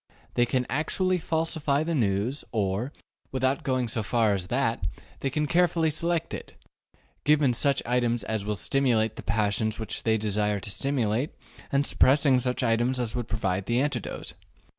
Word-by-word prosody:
They 120 Hz, 0 st, +2 dB
can 125 Hz, 0 st, 0 dB
actually 185 Hz, +5 st, 0 dB
falsify 160 Hz, -3 st, 0 dB
the 165 Hz, +1 st, -2 dB
news, 115 Hz, +1 st, 0 dB
or, 105 Hz, +3 st, -1 dB, 0.4 s
without 130 Hz, +1 st, +1 dB
going 130 Hz, -2 st, 0 dB
so 110 Hz, 0 st, -2 dB
far 110 Hz, 0 st, +2 dB
as 90 Hz, -2 st, -2 dB
that, 120 Hz, -4 st, 0 dB, 0.4 s
they 135 Hz, -, -1 dB
can 150 Hz, +3 st, 0 dB
carefully 170 Hz, 0 st, +2 dB
select 170 Hz, +1 st, -1 dB
it, -, -, -7 dB, 0.7 s
giving 145 Hz, -4 st, +4 dB
such 140 Hz, +3 st, +1 dB
items 120 Hz, -2 st, +1 dB
as 110 Hz, -1 st, -2 dB
will 105 Hz, +1 st, -1 dB
stimulate 115 Hz, -2 st, +1 dB
the -, -, -7 dB
passions 110 Hz, 0 st, 0 dB
which 110 Hz, -, -5 dB
they 110 Hz, -1 st, +2 dB
desire 105 Hz, -1 st, 0 dB
to 105 Hz, -, -2 dB
stimulate, 130 Hz, +1 st, 0 dB, 0.4 s
and 140 Hz, +1 st, +2 dB
suppressing 135 Hz, -1 st, +4 dB
such 125 Hz, 0 st, -1 dB
items 120 Hz, +2 st, +2 dB
as 120 Hz, -1 st, -2 dB
would 120 Hz, -3 st, -3 dB
provide 95 Hz, -2 st, -1 dB
the 120 Hz, +1 st, +2 dB
antidote. 135 Hz, -6 st, -2 dB
125 Hz, 160 wpm, -27 LUFS, 110-140 Hz, 0.7 s, giving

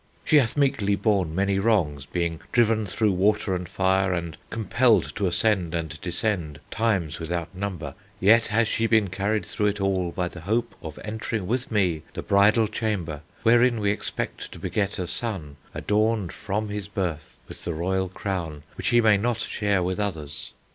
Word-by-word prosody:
She 155 Hz, -, +5 dB
has 130 Hz, -1 st, +2 dB
meekly 130 Hz, -8 st, +2 dB
borne 95 Hz, -7 st, +1 dB
many 100 Hz, +1 st, +1 dB
wrongs, 85 Hz, -11 st, +1 dB
being 85 Hz, -2 st, -2 dB
driven 110 Hz, -3 st, +3 dB
through 105 Hz, +3 st, +1 dB
water 100 Hz, +1 st, +2 dB
and 90 Hz, -1 st, -3 dB
fire, 95 Hz, 0 st, +2 dB
and 85 Hz, -2 st, -3 dB
compelled 110 Hz, -, +2 dB
to 100 Hz, -, 0 dB
ascend 90 Hz, -2 st, +1 dB
and 80 Hz, -2 st, -4 dB
descend 85 Hz, -4 st, -1 dB
times 100 Hz, -9 st, 0 dB
without 85 Hz, +1 st, -3 dB
number 95 Hz, -3 st, -4 dB, 0.3 s
yet 110 Hz, +4 st, +5 dB
has 115 Hz, +1 st, +2 dB
she 115 Hz, 0 st, +1 dB
been 110 Hz, -5 st, +3 dB
carried 105 Hz, +3 st, 0 dB
through 105 Hz, -2 st, 0 dB
it 105 Hz, 0 st, -1 dB
all 95 Hz, -3 st, 0 dB
by 90 Hz, +1 st, -1 dB
the 85 Hz, -1 st, -9 dB
hope 115 Hz, +6 st, 0 dB
of 80 Hz, -4 st, -7 dB
entering 110 Hz, -1 st, -3 dB
with 120 Hz, +5 st, -2 dB
me 90 Hz, -7 st, +1 dB
the -, -, -5 dB
bridal 105 Hz, +3 st, +4 dB
chamber, 100 Hz, -9 st, -2 dB, 0.2 s
wherein 120 Hz, 0 st, +5 dB
we 100 Hz, -1 st, +2 dB
expect 105 Hz, -, -4 dB
to -, -, -10 dB
beget 100 Hz, -2 st, -1 dB
a 90 Hz, -, -2 dB
son 90 Hz, -7 st, -4 dB
adorned 105 Hz, -2 st, 0 dB
from 105 Hz, +2 st, -3 dB
his 105 Hz, -1 st, -4 dB
birth 90 Hz, -7 st, -4 dB
with -, -, -10 dB
the 85 Hz, -, -2 dB
royal 95 Hz, +3 st, 0 dB
crown 85 Hz, -6 st, -4 dB
which -, -, -3 dB
he 120 Hz, -1 st, +5 dB
may 110 Hz, -2 st, +5 dB
not 115 Hz, +3 st, 0 dB
share 105 Hz, -4 st, 0 dB
with 90 Hz, +2 st, -2 dB
others. 80 Hz, -8 st, -4 dB
100 Hz, 175 wpm, -25 LUFS, 90-110 Hz, 0.3 s, She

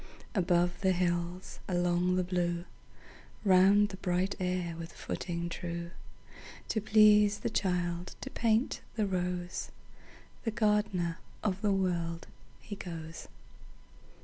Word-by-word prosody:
Above 175 Hz, -2 st, +2 dB
the 190 Hz, -1 st, +3 dB
hills, 175 Hz, 0 st, -2 dB
along 175 Hz, 0 st, +2 dB
the 185 Hz, -, +2 dB
blue, 175 Hz, -1 st, -1 dB, 0.8 s
Round 195 Hz, +2 st, +6 dB
the 190 Hz, -, -7 dB
bright 185 Hz, +1 st, 0 dB
air 180 Hz, -2 st, -1 dB
with 165 Hz, 0 st, -7 dB
footing 170 Hz, -1 st, -4 dB
true, 170 Hz, 0 st, -5 dB, 0.8 s
To 220 Hz, -, 0 dB
please 210 Hz, -1 st, +5 dB
the -, -, -1 dB
child, 180 Hz, -3 st, -1 dB
to -, -, -6 dB
paint 230 Hz, +2 st, +1 dB
the 215 Hz, -2 st, +1 dB
rose, 180 Hz, -2 st, -2 dB, 0.7 s
The 225 Hz, -, 0 dB
gardener 210 Hz, -6 st, +1 dB, 0.2 s
of 195 Hz, -2 st, 0 dB
the 210 Hz, -2 st, +2 dB
World, 175 Hz, -3 st, -1 dB, 0.3 s
he 205 Hz, -, -7 dB
goes. 165 Hz, -4 st, -7 dB
180 Hz, 120 wpm, -31 LUFS, 175-200 Hz, 0.8 s, Round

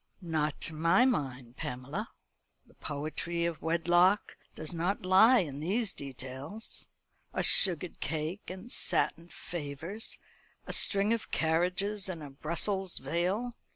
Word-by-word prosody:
"Not 155 Hz, -5 st, -2 dB
to 165 Hz, -, -2 dB
my 165 Hz, +10 st, +3 dB
mind, 130 Hz, -, -2 dB
Pamela. 140 Hz, -, -5 dB, 0.6 s
The -, -, -23 dB
poetry 155 Hz, +3 st, -3 dB
of 170 Hz, -3 st, -3 dB
wedlock 175 Hz, +4 st, +2 dB, 0.2 s
does 155 Hz, +2 st, 0 dB
not 180 Hz, +3 st, -2 dB
lie 220 Hz, +7 st, +6 dB
in 145 Hz, -5 st, -6 dB
these 200 Hz, +7 st, -1 dB
details 135 Hz, -, -2 dB, 0.5 s
a -, -, +1 dB
sugared 180 Hz, -2 st, +6 dB
cake, 160 Hz, +5 st, -4 dB
and 190 Hz, +6 st, -9 dB
satin 170 Hz, +1 st, 0 dB
favours; 170 Hz, -, -3 dB, 0.5 s
a -, -, -4 dB
string 200 Hz, +2 st, +4 dB
of 230 Hz, -, -4 dB
carriages, 185 Hz, +5 st, 0 dB
and 170 Hz, -4 st, -6 dB
a 145 Hz, -, -9 dB
Brussels 180 Hz, +6 st, -2 dB
veil. 180 Hz, -, -1 dB
170 Hz, 125 wpm, -30 LUFS, 150-195 Hz, 0.6 s, lie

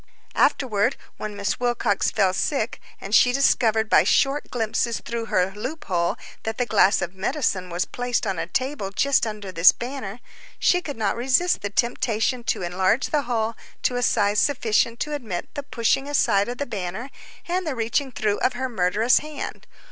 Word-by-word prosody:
Afterward, 240 Hz, -1 st, +2 dB, 0.2 s
when 210 Hz, -1 st, -5 dB
Miss 200 Hz, 0 st, -1 dB
Wilcox 240 Hz, -1 st, +1 dB
fell 195 Hz, -4 st, +2 dB
sick, 240 Hz, +2 st, -1 dB, 0.2 s
and 195 Hz, -, -7 dB
she 245 Hz, +2 st, +6 dB
discovered 225 Hz, -4 st, +2 dB
by -, -, +5 dB
short 280 Hz, +2 st, +2 dB
glimpses 230 Hz, 0 st, -1 dB
through 235 Hz, -1 st, -4 dB
her 185 Hz, -3 st, +1 dB
loop 255 Hz, +11 st, -6 dB
hole 170 Hz, -2 st, 0 dB, 0.2 s
that 220 Hz, 0 st, -4 dB
the 245 Hz, -, +1 dB
glass 210 Hz, -3 st, +3 dB
of 175 Hz, -, -5 dB
medicine 190 Hz, -2 st, -1 dB
was 175 Hz, +2 st, -1 dB
placed 245 Hz, -1 st, -2 dB
on 190 Hz, -4 st, -2 dB
a 165 Hz, -, -3 dB
table 255 Hz, 0 st, -2 dB
just 265 Hz, +5 st, +2 dB
under 210 Hz, -3 st, -6 dB
this 170 Hz, 0 st, +7 dB
banner, 240 Hz, -4 st, -6 dB, 0.4 s
she 360 Hz, -, +3 dB
could 285 Hz, -7 st, -6 dB
not 215 Hz, -3 st, 0 dB
resist 265 Hz, +9 st, +2 dB
the 205 Hz, -, -3 dB
temptation 235 Hz, +2 st, 0 dB
to -, -, -1 dB
enlarge 185 Hz, +8 st, +1 dB
the 300 Hz, -, +2 dB
hole 225 Hz, -1 st, 0 dB, 0.3 s
to 250 Hz, -, +1 dB
a 245 Hz, -, 0 dB
size 205 Hz, -3 st, +2 dB
sufficient 235 Hz, -3 st, +1 dB
to 300 Hz, -, -2 dB
admit 220 Hz, -12 st, -5 dB
the 285 Hz, -, -4 dB
pushing 270 Hz, 0 st, 0 dB
aside 205 Hz, -7 st, +2 dB
of 245 Hz, -, -5 dB
the 285 Hz, -, -2 dB
banner 210 Hz, +3 st, -5 dB, 0.4 s
and 360 Hz, 0 st, -1 dB
the 290 Hz, -, -2 dB
reaching 235 Hz, +4 st, -1 dB
through 210 Hz, -3 st, -1 dB
of 260 Hz, -, +1 dB
her 260 Hz, +2 st, -2 dB
murderous 220 Hz, +2 st, +2 dB
hand. 300 Hz, -1 st, -7 dB
230 Hz, 180 wpm, -24 LUFS, 200-260 Hz, 0.4 s, this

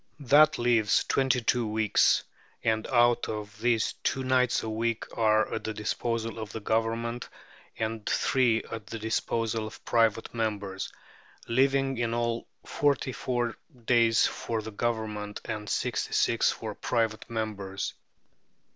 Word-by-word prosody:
That 150 Hz, +3 st, +5 dB
leaves 120 Hz, -3 st, +3 dB
twenty 130 Hz, -2 st, +1 dB
two 120 Hz, 0 st, +1 dB
weeks, 110 Hz, -1 st, +3 dB, 0.4 s
and 110 Hz, 0 st, +1 dB
out 120 Hz, -1 st, +3 dB
of 105 Hz, -1 st, -6 dB
these 115 Hz, -2 st, +2 dB
two 135 Hz, -4 st, -1 dB
nights 130 Hz, -1 st, +2 dB
a 110 Hz, -, -3 dB
week 115 Hz, +1 st, -1 dB
are 110 Hz, -1 st, +2 dB
at -, -, -3 dB
the 110 Hz, -, -4 dB
disposal 115 Hz, +1 st, -2 dB
of 110 Hz, -1 st, -6 dB
the 110 Hz, -, -5 dB
Government 115 Hz, +2 st, -1 dB, 0.5 s
and 110 Hz, -1 st, -3 dB
three 125 Hz, -4 st, +2 dB
at 110 Hz, -2 st, -6 dB
the 115 Hz, -, -5 dB
disposal 110 Hz, 0 st, -1 dB
of 110 Hz, +1 st, -12 dB
private 115 Hz, -2 st, +2 dB
members; 105 Hz, -4 st, -3 dB, 0.6 s
leaving 135 Hz, +1 st, +2 dB
in 115 Hz, -1 st, 0 dB
all 120 Hz, 0 st, -1 dB, 0.2 s
forty 140 Hz, -2 st, +1 dB
four 120 Hz, -2 st, -2 dB, 0.3 s
days 115 Hz, -2 st, +4 dB
for 115 Hz, -2 st, -2 dB
the 110 Hz, -, -6 dB
Government 105 Hz, -2 st, -3 dB
and 105 Hz, -2 st, -4 dB
sixty -, -, -1 dB
six -, -, +3 dB
for -, -, -5 dB
private 115 Hz, -2 st, -1 dB
members. 105 Hz, -4 st, -3 dB
115 Hz, 140 wpm, -28 LUFS, 110-120 Hz, 0.6 s, That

